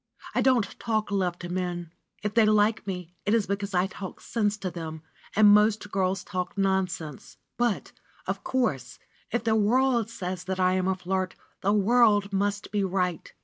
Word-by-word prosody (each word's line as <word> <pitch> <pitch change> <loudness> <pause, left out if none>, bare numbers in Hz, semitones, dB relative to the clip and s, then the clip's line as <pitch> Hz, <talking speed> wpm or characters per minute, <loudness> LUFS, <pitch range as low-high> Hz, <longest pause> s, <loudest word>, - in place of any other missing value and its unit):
I - - +2
don't 255 -4 +4 0.2
talk 215 -3 -1
love 185 -3 0
to 175 - -7
men. 175 -2 -3 0.3
If 210 0 -2
they 230 0 +5
like 215 0 +3
me, 180 -2 -5
it 205 +2 +2
is 220 -3 +2
because 200 0 -3
I 180 +1 +3
talk 190 -1 -7
sense 210 -2 -1
to 190 -3 -4
them, 160 -2 -7 0.3
and 215 0 +7
most 210 0 +3
girls 190 -1 0
talk 185 0 -4
nonsense. 185 -6 -2 0.2
But, 240 -4 0 0.3
of - - -3
course, 145 - -1 0.3
if 240 0 -1
the 225 -1 +2
world 235 +1 +2
says 185 -5 -5
that 190 0 -3
I 185 0 +3
am 185 0 +1
a 190 - +2
flirt, 185 0 -2 0.3
the 200 - +2
world 210 -1 +4
must 200 +1 -1
be 205 -1 +1
right. 180 -3 -1
195 Hz, 180 wpm, -27 LUFS, 185-215 Hz, 0.3 s, and